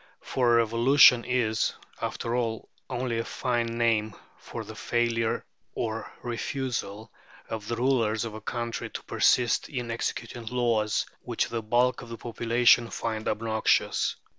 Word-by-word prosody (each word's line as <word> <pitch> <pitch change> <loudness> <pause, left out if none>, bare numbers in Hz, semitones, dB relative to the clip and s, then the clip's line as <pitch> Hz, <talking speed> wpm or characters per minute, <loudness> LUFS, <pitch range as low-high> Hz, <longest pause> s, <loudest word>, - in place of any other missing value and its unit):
For 120 -2 +2
"revolution" 120 +2 +6
is, 120 -3 +1 0.3
after 115 +1 -2
all, 115 -3 -2 0.2
only 120 -2 -2
a - - -1
fine 115 -1 -2
name 110 -3 +1 0.2
for - - -7
the - - -9
failure 115 -1 0 0.3
or 110 -1 -3
refusal 120 -4 -3 0.4
of 110 -2 -5
the 120 - -1
rulers 115 -3 +1
of 110 - -6
a 110 - -8
country 120 +1 -4
to - - -7
persist 120 -2 +2
in 120 -4 -4
executing 115 0 -4
laws 115 -3 +1 0.2
which - - -1
the 115 -1 -2
bulk 120 +3 +2
of 120 - -11
the 115 - -6
population 120 +1 +3
find 110 -2 -3
obnoxious. 110 0 +1
115 Hz, 140 wpm, -27 LUFS, 110-120 Hz, 0.4 s, revolution